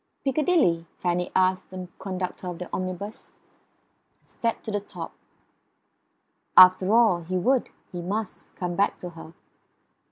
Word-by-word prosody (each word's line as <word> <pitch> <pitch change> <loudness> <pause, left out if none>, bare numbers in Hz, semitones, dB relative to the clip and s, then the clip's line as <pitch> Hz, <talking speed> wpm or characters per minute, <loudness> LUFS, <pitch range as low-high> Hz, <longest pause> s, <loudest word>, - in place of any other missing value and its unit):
"Piccadilly?" 270 - +2
Fanny 180 0 -1
asked 185 0 +2
the 185 -1 -7
conductor 185 -1 -4
of 175 -1 -5
the 180 - -6
omnibus, 185 +4 -5 1.0
and - - -26
climbed 230 -1 0
to 220 - -5
the 205 - 0
top. 205 - -8 1.4
After 185 +1 +8
all, 220 -6 +4
he 185 +3 -3
would, 250 +8 +2 0.2
he 175 - -5
must, 205 +3 -4
come 180 -1 -3
back 200 +3 +1
to 180 - -7
her. 165 -1 -12
185 Hz, 135 wpm, -26 LUFS, 180-210 Hz, 1.4 s, After